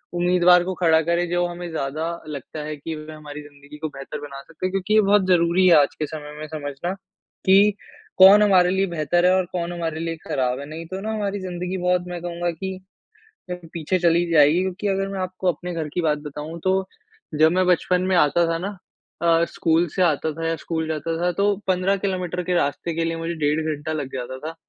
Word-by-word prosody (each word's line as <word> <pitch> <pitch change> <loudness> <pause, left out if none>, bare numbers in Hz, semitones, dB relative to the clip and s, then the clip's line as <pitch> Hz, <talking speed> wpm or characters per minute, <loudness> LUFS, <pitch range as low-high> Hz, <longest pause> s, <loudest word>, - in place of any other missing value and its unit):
उम्मीदवार 180 0 +4
को 185 +1 -3
खड़ा 165 -3 +4
करे 170 +1 +2
जो 175 +1 0
हमें 175 0 -7
ज़्यादा 155 +1 -3 0.2
लगता 150 +1 -7
है 155 0 -5
कि 155 +3 -6
वे 155 +1 -9
हमारी 150 -1 -9
जिंदगी 145 0 -14
को 155 +1 -3
बेहतर 140 +1 -8
बना 140 -2 -8
सकते 165 +5 -7
हैं। 185 - -1
क्योंकि 195 +2 -1
ये 215 - +6
बहुत 200 -1 +3
ज़रूरी 180 +1 +3
है 175 - +7
आज 140 - 0
के 155 - 0
समय 150 -1 -8
में 155 - -6
समझना 150 +3 -4 0.5
कि 195 +2 +5 0.4
कौन 195 +2 +9
हमारे 185 -3 +5
लिए 190 +1 +1
बेहतर 175 +3 +1
है 185 - +5
और 185 -1 +1
कौन 175 -1 -3
हमारे 165 -2 -3
लिए 165 0 -3
खराब 130 -1 -1
है 140 - -6
नहीं 165 +2 -7
तो 190 - -3
ना 220 +2 -3
हमारी 205 -2 -2
जिंदगी 180 0 -4
बहुत 180 0 +2
मैं 175 -1 -6
कहूँगा 175 0 -3
कि 190 +3 -6 0.9
पीछे 170 +2 -1
चली 170 0 +3
जाएगी। 155 +3 +5
क्योंकि 190 +2 -3
अगर 195 0 0
मैं 195 - -4
आपको 185 0 -1
अपने 175 +2 -7
घर 160 -2 -3
की 175 - 0
बात 155 -2 +1
बताऊँ 150 +3 -7
तो 190 0 +3 0.7
जब 160 - +6
मैं 185 +1 +2
बचपन 180 0 +2
में - - +3
आता 170 +1 +4
था 165 - 0
ना 205 -1 -7 0.4
अ, 170 0 +3
स्कूल 165 +1 +1
से 185 - 0
आता 160 -2 +1
था 165 +1 -4
या 165 - 0
स्कूल 160 -1 -2
जाता 160 +1 -2
था 180 0 +2
तो 205 0 +3
15 185 +1 +2
किलोमीटर 180 -2 -2
के 180 - -1
रास्ते 165 +1 -1
के 165 - 0
लिए 165 0 -2
मुझे 165 +1 -3
डेढ़ 150 +2 +1
घंटा 155 +2 -5
लग 145 -4 -4
जाता 130 0 -5
था 165 - -6
170 Hz, 220 wpm, -23 LUFS, 155-185 Hz, 0.9 s, कौन